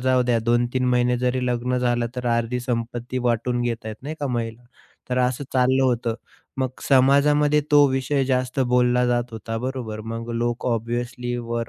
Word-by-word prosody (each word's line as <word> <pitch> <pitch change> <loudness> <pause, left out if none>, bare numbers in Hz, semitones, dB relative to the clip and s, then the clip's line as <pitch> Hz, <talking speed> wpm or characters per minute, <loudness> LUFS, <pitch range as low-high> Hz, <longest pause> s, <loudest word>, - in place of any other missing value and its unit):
जाऊ 130 0 +3
द्या 120 -1 +2
2-3 120 +2 +1
महिने 125 0 +2
जरी 125 0 0
लग्न 125 +1 0
झालं 120 -1 +1
तर 125 0 -3
अर्धी 120 +2 -1
संपत्ती 120 0 -3
वाटून 120 +1 0
घेत 115 -2 -2
आहेत. 110 -1 -6
नाही 150 +3 -5
का 145 - -1
महिला. 115 -2 -3 0.5
तर 125 - +1
असं 125 +2 0
चाललं 130 +1 +3
होतं 120 -3 +1 0.4
मग 130 -1 0 0.2
समाजामध्ये 145 +2 +4
तो 145 -1 +7
विषय 135 +1 0
जास्त 130 0 0
बोलला 125 0 +3
जात 120 0 0
होता, 115 0 -5
बरोबर? 125 -4 -4
मग 115 +2 -6
लोक 120 +1 -2
ऑब्व्हियसली 120 +1 -2
वर 115 -1 -3
125 Hz, 170 wpm, -23 LUFS, 120-130 Hz, 0.5 s, तो